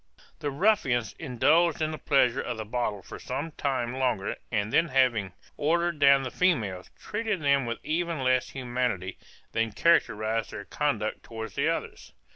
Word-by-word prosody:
The 145 - -2
ruffians 135 - +1
indulged 160 +4 +2
in 155 0 0
the 155 - -6
pleasures 135 -3 +2
of 120 -2 -3
the 110 - -5
bottle 105 -3 -2
for - - -9
some 145 +6 -4
time 130 -5 -2
longer, 125 -7 -1 0.2
and 105 -2 -1
then 165 - +4
having 125 - +2 0.2
ordered 170 +2 +1
down 140 -1 +6
the 130 - -4
females, 110 - 0
treated 215 -2 -2
them 140 -3 +3
with 115 - -2
even 165 -2 -1
less 130 0 +2
humanity 125 -7 -3 0.3
than 115 -2 -1
characterized 110 -9 +2
their 100 - -7
conduct 115 -7 -1
towards 110 -3 -7
the - - +1
others. - - -4
130 Hz, 160 wpm, -27 LUFS, 110-155 Hz, 0.3 s, down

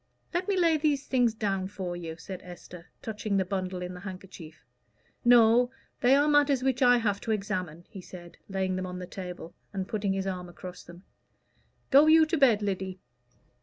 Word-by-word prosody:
"Let 350 +2 -1
me 400 -2 +1
lay 335 -3 +4
these 290 -2 0
things 245 -4 +2
down 195 -3 -1
for 185 -3 -5
you," 165 -2 -6
said 185 +2 -8
Esther, 175 -1 -12 0.2
touching 215 -2 -2
the 190 - +1
bundle 185 -1 -3
in 180 0 -5
the 180 - -9
handkerchief. 180 -5 -10 0.6
"No; 240 0 +6 0.3
they 255 +2 +5
are 290 +1 +3
matters 290 -3 +3
which 265 -1 0
I 245 -1 +6
have 205 -4 -1
to 225 - -3
examine," 185 -5 -3
he 190 - -10
said, 175 -1 -12
laying 190 -1 -1
them 185 0 -3
on 180 0 -6
the 180 - -6
table, 180 -2 -8 0.2
and 190 -2 -4
putting 205 -3 -1
his 195 0 -2
arm 180 -2 -4
across 180 +1 -9
them. 175 +2 -14 0.9
"Go 280 +3 +7
you 315 0 +7
to 325 +1 -1
bed, 230 -7 +4
Lyddy." 190 -2 -3
195 Hz, 190 wpm, -28 LUFS, 180-245 Hz, 0.9 s, Go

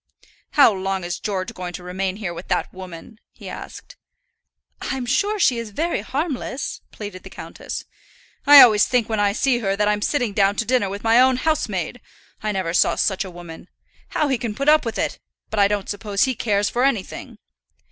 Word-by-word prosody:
"How 275 -6 +7
long 190 -1 -2
is 175 0 -4
George 190 -3 -3
going 180 -1 -6
to 180 - -7
remain 185 +1 -3
here 195 -5 -4
with 170 - -9
that - - -1
woman?" 185 +3 -10
he - - -12
asked. - - -9 0.8
"I'm 265 -2 -3
sure 400 - +1
she 250 - +3
is 230 -2 -6
very 325 +11 -1
harmless," 275 -2 -4
pleaded 205 -3 -8
the - - -11
countess. - - -7 0.6
"I 290 -1 +11
always 215 -4 +6
think 245 -3 +1
when 220 -2 -1
I 205 -1 +3
see 245 +3 +1
her 195 -4 0
that 210 +1 +1
I'm 210 0 +1
sitting 245 -4 0
down 200 0 +3
to 230 - -1
dinner 240 -4 +1
with 200 +1 -6
my 230 +2 +5
own 260 0 +4
housemaid. 245 - -1 0.4
I 215 -1 -1
never 185 -4 -2
saw - - +3
such 190 -1 0
a 190 - -8
woman. 175 -1 -11 0.4
How 305 - 0
he 265 -4 0
can 225 -4 -4
put 275 +4 +1
up 305 -3 +5
with 230 - -3
it! - - -2 0.3
But 220 - -1
I 200 - +6
don't 205 -1 -2
suppose 205 -1 -1
he 260 - +1
cares 205 -3 0
for 245 - 0
anything." 250 -8 -2
210 Hz, 200 wpm, -22 LUFS, 195-255 Hz, 0.8 s, I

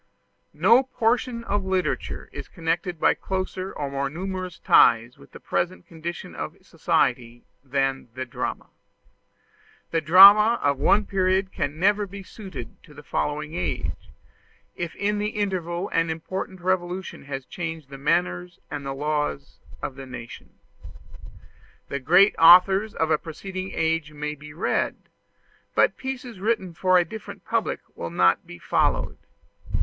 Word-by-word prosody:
No 235 +3 +6
portion 240 -1 -1
of 205 -2 -1
literature 185 -4 -2
is - - -8
connected 170 +1 -2
by - - +4
closer 185 0 -4
or 140 -2 -5
more 140 0 -1
numerous 185 +2 -5
ties 115 +1 +4
with 70 - -17
the - - -11
present 180 0 -2
condition 170 +1 -7
of - - -6
society 120 -2 0 0.2
than 135 -1 -1
the 130 0 -4
drama. 120 - -5 1.2
The 165 - +1
drama 200 +8 +8
of 140 -1 +1
one 205 +9 +3
period 190 0 +1
can 145 +2 -3
never 205 +2 +2
be 195 +1 -9
suited 195 -1 -9
to 150 -4 -17
the 150 - -12
following 150 +2 -2
age, 175 - -3 0.7
if 170 -2 -5
in 205 +1 -1
the 210 +1 0
interval 185 -3 -2
an 165 0 +1
important 185 +3 -5
revolution 180 -2 -2
has 135 -1 -5
changed 160 -5 -6
the 135 - -9
manners 90 -9 0
and 145 -1 -4
the 135 0 -4
laws 150 -1 -2 0.2
of - - -3
the 135 0 -10
nation. 120 -2 -9 1.4
The 140 - -3
great 180 +9 +5
authors 190 +5 +7
of 160 0 0
a 150 - +3
preceding 185 +4 -6
age 160 -1 -1
may 150 0 -4
be 150 0 -12
read; 155 - -1 0.8
but - - +4
pieces 255 -5 -6
written 195 -4 -1
for 185 +2 +3
a 175 - +3
different 220 +6 -9
public - - -1
will 85 - -5
not 90 +1 +2
be 85 - -10
followed. - - 0
170 Hz, 145 wpm, -24 LUFS, 145-190 Hz, 1.4 s, drama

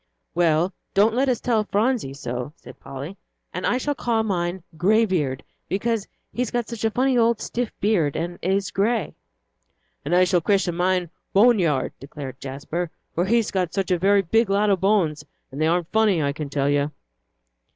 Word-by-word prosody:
"Well, 170 +1 +2 0.2
don't 210 +3 +4
let 265 +3 +2
us 245 - +1
tell 225 -3 +1
Phronsie 210 - 0
so," 125 +1 -5
said - - -14
Polly, 140 +8 -8 0.4
"and - - -2
I 245 - +2
shall 290 +3 -1
call 235 -5 0
mine 180 -3 -2
'Greybeard' 180 - +1 0.3
because 220 +1 -1 0.3
he's 250 -2 -1
got 240 -2 -2
such 235 -2 -6
a 225 - +3
funny 255 +2 +2
old 230 -1 +3
stiff 240 -1 -3
beard 180 -9 +1
and 175 +1 -3
it 180 - -1
is 195 -1 0
grey." 215 +2 0 0.9
"And 155 +5 0
I 180 - +6
shall 180 -1 +2
christen 195 -1 +1
mine 180 -1 0 0.2
'Boneyard,'" 195 - +3
declared 135 -2 -8
Jasper, 145 +6 -4 0.2
"for 175 - +1
he's 230 +2 +2
got 180 -4 -1
such 195 -2 -1
a 180 - +2
very 200 +2 +4
big 225 +5 +2
lot 205 +1 +3
of 190 - +1
bones, 180 -7 +2 0.3
and 140 +3 -5
they 155 - +3
aren't 170 0 0
funny, 215 -5 +3
I 140 0 0
can 150 -1 -5
tell 140 0 0
you." 145 0 +2
190 Hz, 185 wpm, -23 LUFS, 160-220 Hz, 0.9 s, I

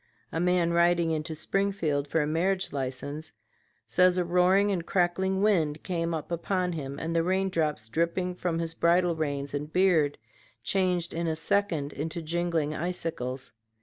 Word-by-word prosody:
A 165 - -2
man 175 -1 +2
riding 170 -1 +3
into 155 0 -2
Springfield 165 -5 -1
for 155 +2 +1
a - - -1
marriage 185 +5 0
license 140 +3 -4 0.5
says 180 +11 +3
a 180 - +1
roaring 180 +4 +3
and 180 -4 -1
crackling 190 +2 +1
wind 160 -8 +2
came 170 -2 -1
upon 175 +3 -1
him 140 -3 -5
and 165 +2 -3
the 165 - +4
rain 190 +3 +1
drops 150 -10 -1
dripping 170 +7 -1
from 175 -2 -2
his 165 -1 -2
bridle 170 +1 +3
reins 145 -3 -3
and 145 +1 -4
beard 170 -6 +3 0.5
changed 180 -3 0
in 170 +1 -2
a 160 - 0
second 165 -5 0
into 160 +4 -4
jingling 165 -2 -1
icicles. 155 -7 -4
170 Hz, 155 wpm, -28 LUFS, 155-180 Hz, 0.5 s, the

